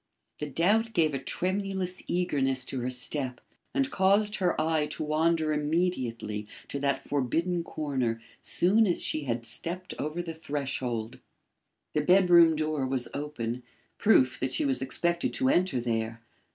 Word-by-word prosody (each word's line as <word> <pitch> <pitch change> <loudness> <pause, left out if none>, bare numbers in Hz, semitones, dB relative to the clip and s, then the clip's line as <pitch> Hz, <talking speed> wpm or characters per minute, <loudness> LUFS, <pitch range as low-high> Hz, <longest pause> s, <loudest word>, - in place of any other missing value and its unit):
The 150 - -4
doubt 210 - +2
gave 160 -6 +2
a 135 - -1
tremulous 185 +4 -1
eagerness 135 -7 0
to 130 - -4
her 125 +1 -2
step 130 0 -2 0.3
and 275 +1 0
caused 205 +2 +3
her 180 -3 +1
eye 155 -1 +1
to 150 - -4
wander 155 +1 +1
immediately 130 -10 -1 0.2
to 140 - -3
that 140 0 0
forbidden 165 +6 0
corner 130 -8 -2 0.2
soon 210 +5 +3
as 175 - 0
she 155 -2 -2
had 115 -2 -2
stepped 175 +10 -5
over 155 +4 -2
the 165 -1 -5
threshold. 130 -6 -3 0.7
The 150 - +2
bedroom 175 -1 +6
door 155 -3 -1
was 130 -2 -1
open; 125 -5 -4 0.4
proof 130 - +4
that 130 - -1
she - - +1
was 135 -2 +1
expected 170 +6 0
to 265 -1 +2
enter 185 - +2
there. 115 -1 -2
150 Hz, 150 wpm, -28 LUFS, 130-175 Hz, 0.7 s, bedroom